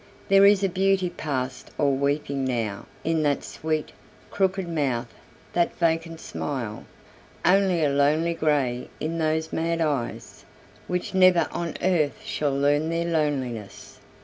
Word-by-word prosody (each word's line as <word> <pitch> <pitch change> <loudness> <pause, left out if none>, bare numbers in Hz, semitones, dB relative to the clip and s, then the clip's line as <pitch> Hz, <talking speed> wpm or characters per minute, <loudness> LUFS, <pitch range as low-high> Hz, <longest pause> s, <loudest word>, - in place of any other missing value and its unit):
There 195 0 +7
is 200 -1 +4
a - - +4
beauty 190 -1 +1
past 130 -6 -4
all 140 -2 +2
weeping 140 0 -1
now 115 -6 -2 0.2
In 165 0 +1
that 145 -2 +1
sweet, 155 -1 -3 0.4
crooked 190 -1 0
mouth, 135 -8 -1 0.4
that 175 -1 +1
vacant 165 -1 0
smile; 120 -11 -5 0.6
Only 185 -2 +4
a 145 - +3
lonely 150 +4 +2
grey 140 -6 0
in 165 +2 -2
those 160 0 0
mad 165 +1 0
eyes, 145 -7 -2 0.4
Which 180 +1 -2
never 185 -2 +5
on 170 -2 -4
earth 170 -2 +1
shall 150 -10 -1
learn 145 +3 +2
their 165 0 -1
loneliness. 135 -10 -3
155 Hz, 135 wpm, -25 LUFS, 140-170 Hz, 0.6 s, There